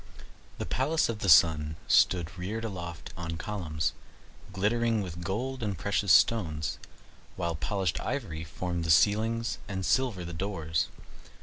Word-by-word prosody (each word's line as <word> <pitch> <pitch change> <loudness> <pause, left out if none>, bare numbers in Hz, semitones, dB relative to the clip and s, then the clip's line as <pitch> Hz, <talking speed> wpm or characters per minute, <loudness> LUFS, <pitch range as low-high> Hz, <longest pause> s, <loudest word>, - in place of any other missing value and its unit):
The - - -3
palace 140 - +1
of 110 -2 -3
the 100 - 0
Sun 75 -3 +5
stood 85 -2 +3
reared 105 +5 -4
aloft 85 -6 -6
on 80 -1 -5
columns, 80 -8 -2 0.6
glittering 110 +2 +1
with 85 -2 -7
gold 125 +9 -3
and 100 -4 -2
precious 100 +1 0
stones, 80 -10 +3 0.6
while 85 -2 -2
polished 95 +3 -1
ivory 100 - -3
formed 85 +1 -4
the 80 - -3
ceilings, 110 +7 +3
and 95 -2 -3
silver 120 -9 +1
the 85 - -6
doors. 80 -3 -1
95 Hz, 135 wpm, -29 LUFS, 85-110 Hz, 0.6 s, Sun